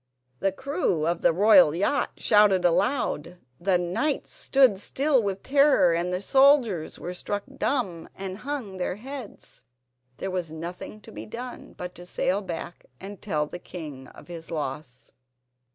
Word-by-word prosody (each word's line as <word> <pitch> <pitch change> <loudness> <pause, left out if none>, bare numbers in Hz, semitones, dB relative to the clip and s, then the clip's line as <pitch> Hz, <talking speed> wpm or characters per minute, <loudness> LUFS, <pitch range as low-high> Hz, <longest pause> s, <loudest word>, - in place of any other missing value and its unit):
The 195 - +1
crew 230 - -1
of 170 +1 0
the - - +5
royal 185 -3 +6
yacht 205 +10 0
shouted 210 -4 +4
aloud, 175 - 0 0.2
the 185 +1 +2
knights 180 - -1
stood 260 -8 +3
still 270 +5 +1
with 195 -2 -3
terror, 275 - +4
the 180 +2 -2
soldiers 265 - +4
were 180 - -6
struck 205 +3 -3 0.2
dumb 190 -12 -1
and 190 0 -6
hung 250 -8 -5
their 180 0 -2
heads. 255 +1 -8 0.6
There 190 - -4
was 180 -4 -3
nothing 175 +6 -7
to 225 - -13
be - - -8
done 245 +3 -8
but 180 0 -6
to 175 0 -12
sail 190 +2 0
back 175 -2 -7
and 200 +1 -9
tell 155 -7 -1
the 175 - -8
king 150 -7 -8
of - - -15
his 170 -2 -8
loss. 140 -4 -5
190 Hz, 150 wpm, -26 LUFS, 175-235 Hz, 0.6 s, royal